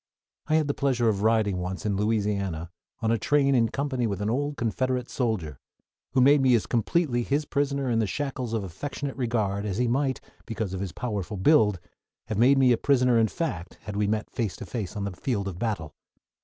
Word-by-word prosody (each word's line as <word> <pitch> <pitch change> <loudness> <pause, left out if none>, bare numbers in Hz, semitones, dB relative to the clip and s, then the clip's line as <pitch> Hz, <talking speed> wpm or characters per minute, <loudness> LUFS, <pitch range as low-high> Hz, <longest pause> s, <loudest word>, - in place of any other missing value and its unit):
I 155 - +2
had 155 -2 +2
the 145 - 0
pleasure 125 -5 +1
of 100 -2 -1
riding 110 -3 +2
once 90 +2 -4
in 105 -2 +1
Louisiana 100 -5 -1 0.3
on 110 - +2
a 115 - +1
train 140 +2 +3
in 115 -3 +3
company 130 -2 -1
with 100 -2 -3
an 105 +1 -1
old 145 +3 -1
Confederate 125 +2 -1
soldier, 100 - -2 0.5
who 130 - +4
made 140 +2 +6
me 130 -2 +5
as 115 - +1
completely 120 - +1
his 140 +5 0
prisoner 140 -2 -1
in 115 -2 +1
the 110 - +1
shackles 130 -1 -3
of 110 -3 -1
affectionate 135 - -5
regard 110 -6 -1
as 100 -2 -3
he 125 0 +1
might, 130 +2 0 0.3
because 110 -4 -3
of 95 - -3
his 95 -3 -3
powerful 105 -4 -4
build, 105 - +4 0.5
have 110 - -1
made 135 +4 +6
me 130 -2 +5
a 120 - +4
prisoner 125 -3 +3
in 110 - +4
fact 110 - -4
had 105 - -6
we 105 0 +1
met 105 0 -1
face 110 -6 -2
to - - -8
face 110 -5 -5
on 100 - -3
the 100 - -2
field 100 +1 -2
of 90 -2 -6
battle. 100 -10 -2
115 Hz, 210 wpm, -26 LUFS, 100-130 Hz, 0.5 s, made